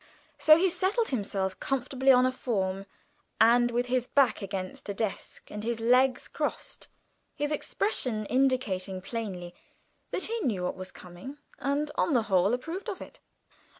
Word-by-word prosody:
So 310 Hz, 0 st, +8 dB
he 370 Hz, +3 st, +3 dB
settled 375 Hz, +6 st, 0 dB
himself 195 Hz, -6 st, -2 dB
comfortably 265 Hz, 0 st, +2 dB
on 250 Hz, 0 st, +6 dB
a 255 Hz, -, +2 dB
form 195 Hz, -6 st, -2 dB, 0.8 s
with 240 Hz, +1 st, 0 dB
his 250 Hz, 0 st, 0 dB
back 260 Hz, -6 st, +3 dB
against 195 Hz, 0 st, -5 dB
a 200 Hz, -, -3 dB
desk 215 Hz, -2 st, -4 dB
and 210 Hz, 0 st, -6 dB
his 230 Hz, 0 st, -2 dB
legs 250 Hz, +3 st, +3 dB
crossed, -, -, -4 dB, 0.5 s
his 295 Hz, +1 st, -2 dB
expression 255 Hz, -, -1 dB
indicating 235 Hz, -8 st, 0 dB
plainly 195 Hz, -6 st, -5 dB, 0.6 s
that 370 Hz, -, -3 dB
he 460 Hz, +1 st, -2 dB
knew 215 Hz, -, -1 dB
what 180 Hz, -, -2 dB
was 185 Hz, 0 st, -7 dB
coming 180 Hz, +11 st, -10 dB, 0.2 s
and, 285 Hz, +3 st, -1 dB
on 320 Hz, -, +2 dB
the 235 Hz, -, +3 dB
whole, 195 Hz, -1 st, +3 dB
approved 335 Hz, -, -5 dB
of 390 Hz, -, -5 dB
it. -, -, -11 dB
245 Hz, 150 wpm, -28 LUFS, 195-275 Hz, 0.8 s, So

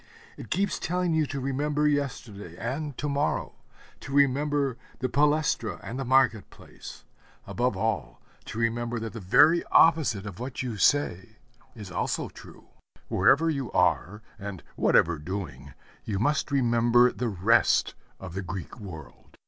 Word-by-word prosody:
It -, -, -10 dB
keeps 195 Hz, +3 st, 0 dB
telling 180 Hz, 0 st, -1 dB
you 155 Hz, -2 st, +1 dB
to 140 Hz, -, -4 dB
remember 145 Hz, +3 st, 0 dB
yesterday 120 Hz, -, -3 dB
and 140 Hz, +3 st, -4 dB
to 150 Hz, -, -3 dB
morrow; 145 Hz, +1 st, -1 dB, 0.5 s
to 135 Hz, -, -9 dB
remember 140 Hz, -1 st, +2 dB, 0.2 s
the 130 Hz, -, -1 dB
palæstra 150 Hz, +3 st, +1 dB
and 125 Hz, +4 st, -6 dB
the -, -, -2 dB
market 130 Hz, -4 st, +2 dB
place; -, -, -12 dB, 0.4 s
above 120 Hz, -4 st, -1 dB
all 110 Hz, +1 st, -2 dB, 0.3 s
to -, -, -8 dB
remember 115 Hz, +1 st, -1 dB
that 110 Hz, -1 st, -6 dB
the 115 Hz, -, -6 dB
very 150 Hz, -, +5 dB
opposite 150 Hz, -11 st, +3 dB
of 105 Hz, -1 st, -8 dB
what 125 Hz, +1 st, -5 dB
you 120 Hz, -3 st, -4 dB
say 110 Hz, -2 st, +1 dB, 0.4 s
is 105 Hz, -5 st, -9 dB
also 85 Hz, -, -2 dB
true. -, -, -15 dB, 0.4 s
Wherever 160 Hz, +4 st, +4 dB
you 135 Hz, -5 st, -4 dB
are, 105 Hz, +4 st, +1 dB, 0.2 s
and 100 Hz, -3 st, -7 dB
whatever 80 Hz, -2 st, +3 dB
doing, 95 Hz, +4 st, -7 dB, 0.3 s
you 105 Hz, -3 st, -3 dB
must 145 Hz, +11 st, 0 dB
remember 120 Hz, -2 st, +3 dB
the 120 Hz, -1 st, -3 dB
rest 105 Hz, +4 st, +2 dB, 0.3 s
of 95 Hz, -3 st, -8 dB
the 95 Hz, -, -3 dB
Greek 95 Hz, +4 st, -7 dB
world. 80 Hz, -9 st, -11 dB
120 Hz, 150 wpm, -27 LUFS, 105-145 Hz, 0.5 s, very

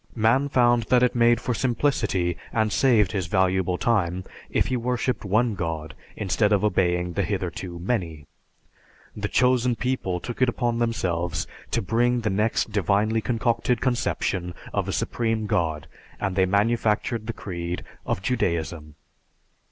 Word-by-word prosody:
Man 120 Hz, +5 st, +3 dB
found 120 Hz, -3 st, +3 dB
that 125 Hz, -1 st, +5 dB
it 125 Hz, -, +3 dB
made 120 Hz, -1 st, +4 dB
for 125 Hz, -, -2 dB
simplicity 115 Hz, -, 0 dB, 0.2 s
and 110 Hz, -2 st, +1 dB
saved 115 Hz, -8 st, +4 dB
his 95 Hz, -6 st, -2 dB
valuable 95 Hz, -1 st, +1 dB
time 95 Hz, -6 st, 0 dB, 0.3 s
if -, -, +1 dB
he 130 Hz, -, -1 dB
worshiped 125 Hz, +1 st, -1 dB
one 110 Hz, +4 st, +2 dB
god, 80 Hz, -4 st, -4 dB, 0.2 s
instead 105 Hz, +1 st, +1 dB
of 105 Hz, -1 st, +3 dB
obeying 90 Hz, -3 st, +1 dB
the 100 Hz, -, 0 dB
hitherto 95 Hz, -2 st, -3 dB
many. 85 Hz, -6 st, -3 dB, 0.9 s
The 105 Hz, -1 st, -2 dB
"Chosen 125 Hz, 0 st, +2 dB
People" 120 Hz, -8 st, -2 dB
took 120 Hz, +6 st, -7 dB
it 130 Hz, -, +5 dB
upon 120 Hz, -1 st, -1 dB
themselves 90 Hz, -8 st, -1 dB, 0.2 s
to -, -, -1 dB
bring 120 Hz, +4 st, +1 dB
the 110 Hz, -3 st, 0 dB
next 105 Hz, +2 st, 0 dB
divinely 105 Hz, +3 st, +1 dB
concocted 120 Hz, +1 st, 0 dB
conception 100 Hz, -8 st, -1 dB, 0.2 s
of -, -, -1 dB
a -, -, -1 dB
Supreme 115 Hz, -2 st, -1 dB
God, 80 Hz, -8 st, -1 dB, 0.3 s
and 95 Hz, -2 st, -2 dB
they 95 Hz, -1 st, +3 dB
manufactured 110 Hz, +2 st, +1 dB
the 115 Hz, -, -2 dB
creed 85 Hz, -4 st, -5 dB, 0.2 s
of 90 Hz, -, -2 dB
Judaism. 85 Hz, -9 st, -2 dB
105 Hz, 145 wpm, -25 LUFS, 90-120 Hz, 0.9 s, that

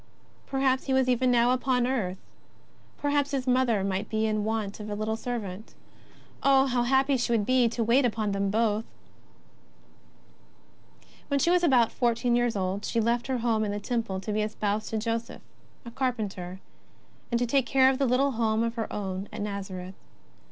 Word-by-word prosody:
Perhaps 265 Hz, -1 st, +1 dB
He 270 Hz, -, 0 dB
was 265 Hz, -1 st, +3 dB
even 255 Hz, 0 st, +2 dB
now 240 Hz, 0 st, +4 dB
upon 255 Hz, -1 st, +1 dB
earth. 215 Hz, -8 st, -1 dB, 0.8 s
Perhaps 285 Hz, -1 st, 0 dB
Plis 275 Hz, -3 st, -2 dB
Mother 250 Hz, -5 st, +2 dB
might 195 Hz, +2 st, -2 dB
be 220 Hz, 0 st, 0 dB
in 215 Hz, -1 st, 0 dB
want 215 Hz, -2 st, -2 dB
of 210 Hz, 0 st, -7 dB
a 205 Hz, -, -3 dB
little 215 Hz, +1 st, -2 dB
servant. 220 Hz, -4 st, -6 dB, 0.7 s
Oh, 270 Hz, -1 st, +5 dB
how 250 Hz, -2 st, +1 dB
happy 265 Hz, +2 st, +2 dB
she 240 Hz, 0 st, -1 dB
would 220 Hz, -3 st, +2 dB
be 255 Hz, -1 st, +3 dB
to 230 Hz, 0 st, -2 dB
wait 240 Hz, +5 st, +3 dB
upon 220 Hz, -3 st, 0 dB
them 200 Hz, 0 st, 0 dB
both! 215 Hz, 0 st, +1 dB, 2.4 s
When 280 Hz, -1 st, +1 dB
she 340 Hz, -, +3 dB
was 360 Hz, 0 st, +3 dB
about 250 Hz, -8 st, +4 dB
fourteen 240 Hz, 0 st, +1 dB
years 240 Hz, -2 st, +1 dB
old, 190 Hz, +1 st, -2 dB
she 230 Hz, -, -1 dB
left 235 Hz, +2 st, 0 dB
her 260 Hz, -1 st, 0 dB
home 225 Hz, -2 st, +1 dB
in 205 Hz, -, -1 dB
the 205 Hz, -, -3 dB
Temple 225 Hz, -3 st, -2 dB
to 210 Hz, +2 st, -4 dB
be 215 Hz, -, +1 dB
espoused 210 Hz, 0 st, -2 dB
to 220 Hz, -, -2 dB
Joseph, 230 Hz, +2 st, -3 dB, 0.4 s
a 235 Hz, -, -8 dB
car 260 Hz, +1 st, 0 dB
penter, 190 Hz, -5 st, -6 dB, 0.7 s
and 235 Hz, -, +2 dB
to 245 Hz, -, +1 dB
take 255 Hz, +1 st, +1 dB
care 265 Hz, -1 st, +4 dB
of 265 Hz, +1 st, -3 dB
a -, -, +4 dB
little 265 Hz, +3 st, +2 dB
home 225 Hz, -2 st, +1 dB
of 230 Hz, 0 st, -1 dB
her 230 Hz, -2 st, -4 dB
own 195 Hz, -1 st, -4 dB
at -, -, -5 dB
Nazareth. 190 Hz, -3 st, -5 dB
230 Hz, 185 wpm, -27 LUFS, 210-255 Hz, 2.4 s, Oh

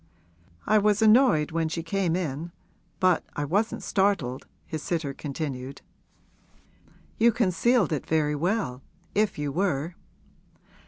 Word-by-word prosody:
'I 215 Hz, +1 st, +4 dB
was 210 Hz, +1 st, +2 dB
annoyed 215 Hz, -, +5 dB
when 165 Hz, -1 st, 0 dB
she 165 Hz, +1 st, -3 dB
came 175 Hz, -1 st, 0 dB
in 165 Hz, -1 st, -3 dB, 0.5 s
but 185 Hz, -3 st, +3 dB
I 145 Hz, -, -2 dB
wasn't 205 Hz, +9 st, -1 dB
startled,' 190 Hz, -11 st, 0 dB, 0.2 s
his 155 Hz, -2 st, -5 dB
sitter 160 Hz, -5 st, -2 dB
continued. 135 Hz, -2 st, -5 dB, 1.4 s
'You 235 Hz, +1 st, +6 dB
concealed 230 Hz, -, +2 dB
it 150 Hz, -, -3 dB
very 155 Hz, -2 st, +1 dB
well, 165 Hz, -, -1 dB, 0.3 s
if 210 Hz, +1 st, +1 dB
you 145 Hz, -1 st, -2 dB
were.' 165 Hz, -1 st, -1 dB
170 Hz, 120 wpm, -26 LUFS, 150-205 Hz, 1.4 s, You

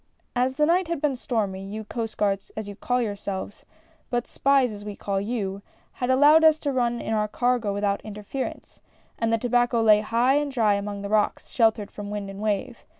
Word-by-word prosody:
As 255 Hz, +2 st, +1 dB
the 300 Hz, +1 st, +3 dB
night 350 Hz, +3 st, +2 dB
had 335 Hz, -2 st, -2 dB
been 280 Hz, -2 st, 0 dB
stormy, 205 Hz, -6 st, -2 dB
you 210 Hz, +3 st, -6 dB
Coast 225 Hz, +1 st, -5 dB
Guards 195 Hz, -1 st, 0 dB
as 215 Hz, -1 st, -4 dB
you 205 Hz, -, -7 dB
call 245 Hz, +4 st, 0 dB
yourselves 200 Hz, -2 st, -5 dB, 0.2 s
— -, -, -35 dB
but 240 Hz, -1 st, -1 dB
spies 275 Hz, -3 st, +2 dB
as 205 Hz, -1 st, -8 dB
we 205 Hz, -1 st, -6 dB
call 195 Hz, -1 st, -2 dB
you 200 Hz, -3 st, -3 dB, 0.2 s
— -, -, -36 dB
had 245 Hz, -, -1 dB
allowed 290 Hz, +5 st, +6 dB
us 315 Hz, -1 st, +6 dB
to 285 Hz, -, -1 dB
run 240 Hz, -2 st, 0 dB
in 225 Hz, -, -3 dB
our 210 Hz, -1 st, +1 dB
cargo 245 Hz, -1 st, 0 dB
without 200 Hz, 0 st, -1 dB
interference, 210 Hz, +5 st, -6 dB, 0.4 s
and 230 Hz, -1 st, +1 dB
the 230 Hz, -, +3 dB
tobacco 240 Hz, 0 st, +2 dB
lay 215 Hz, -2 st, +5 dB
high 235 Hz, +5 st, +2 dB
and 290 Hz, -1 st, -1 dB
dry 225 Hz, -5 st, +3 dB
among 200 Hz, 0 st, -3 dB
the 200 Hz, -, -4 dB
rocks, 210 Hz, 0 st, 0 dB
sheltered 220 Hz, -3 st, +1 dB
from 205 Hz, -1 st, -7 dB
wind 205 Hz, -1 st, -4 dB
and 195 Hz, -, -9 dB
wave. 215 Hz, +4 st, -2 dB
225 Hz, 210 wpm, -25 LUFS, 205-250 Hz, 0.4 s, allowed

